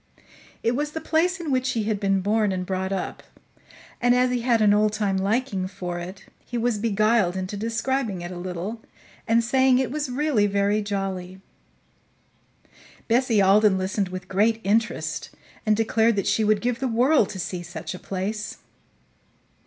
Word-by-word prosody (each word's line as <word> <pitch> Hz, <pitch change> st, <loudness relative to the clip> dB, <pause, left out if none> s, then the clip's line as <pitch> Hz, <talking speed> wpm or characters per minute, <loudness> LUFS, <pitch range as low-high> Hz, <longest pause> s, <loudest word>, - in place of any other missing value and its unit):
It 230 Hz, +1 st, +1 dB
was 295 Hz, +2 st, -2 dB
the 320 Hz, -, -3 dB
place 350 Hz, +4 st, +1 dB
in 325 Hz, -4 st, -3 dB
which 255 Hz, 0 st, +1 dB
he 225 Hz, -, -1 dB
had 210 Hz, -1 st, -1 dB
been 195 Hz, -1 st, +1 dB
born 210 Hz, +1 st, +1 dB
and 185 Hz, -1 st, -2 dB
brought 190 Hz, 0 st, -2 dB
up, 190 Hz, -2 st, -3 dB, 0.8 s
and, 245 Hz, 0 st, +4 dB
as 250 Hz, 0 st, +3 dB
he 245 Hz, -1 st, 0 dB
had 235 Hz, -1 st, +2 dB
an 210 Hz, -1 st, +5 dB
old 210 Hz, 0 st, +3 dB
time 205 Hz, -2 st, 0 dB
liking 195 Hz, 0 st, 0 dB
for 180 Hz, -3 st, -5 dB
it, 185 Hz, +3 st, -8 dB, 0.2 s
he 240 Hz, -, -5 dB
was 235 Hz, -2 st, 0 dB
beguiled 215 Hz, -3 st, +2 dB
into 185 Hz, +2 st, -4 dB
describing 230 Hz, -1 st, -2 dB
it 175 Hz, +1 st, -6 dB
a -, -, -7 dB
little 185 Hz, +5 st, -5 dB, 0.5 s
and 230 Hz, +1 st, +3 dB
saying 260 Hz, +1 st, +3 dB
it 255 Hz, -2 st, 0 dB
was 295 Hz, -1 st, -2 dB
really 255 Hz, -5 st, +1 dB
very 200 Hz, +1 st, +1 dB
jolly. 190 Hz, -2 st, -4 dB, 1.7 s
Bessie 235 Hz, -3 st, +3 dB
Alden 200 Hz, 0 st, +5 dB
listened 190 Hz, +1 st, -1 dB
with 185 Hz, 0 st, -7 dB
great 220 Hz, +4 st, +2 dB
interest 220 Hz, +3 st, 0 dB, 0.4 s
and 215 Hz, -1 st, +4 dB
declared 225 Hz, 0 st, +2 dB
that 200 Hz, -, -1 dB
she 220 Hz, -, +2 dB
would 215 Hz, -1 st, +2 dB
give 245 Hz, 0 st, -1 dB
the 265 Hz, -, -1 dB
world 245 Hz, 0 st, +3 dB
to 190 Hz, -, -6 dB
see 180 Hz, 0 st, -4 dB
such 175 Hz, -1 st, -7 dB
a 180 Hz, -, -8 dB
place. 200 Hz, +3 st, -4 dB
215 Hz, 175 wpm, -24 LUFS, 190-240 Hz, 1.7 s, an